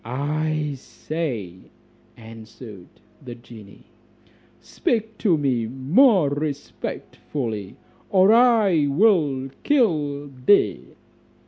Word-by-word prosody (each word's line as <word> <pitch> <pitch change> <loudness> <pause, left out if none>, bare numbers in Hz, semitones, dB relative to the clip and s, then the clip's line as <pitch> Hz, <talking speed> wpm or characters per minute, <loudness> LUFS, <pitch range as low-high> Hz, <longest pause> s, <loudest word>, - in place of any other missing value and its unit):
"I 150 +4 -2
say," 125 - -5 0.6
answered 110 -3 -12 0.4
the 120 -2 -8
genie, 115 -4 -15 0.8
"speak 220 -1 -3
to 180 -7 +2
me 130 -6 -1
more 155 - +3
respectfully, 140 -6 -5 0.3
or 195 +2 +4
I 220 -10 +4
will 145 -6 +1
kill 150 - 0 0.2
thee." 205 - +2
145 Hz, 80 wpm, -22 LUFS, 120-185 Hz, 0.8 s, or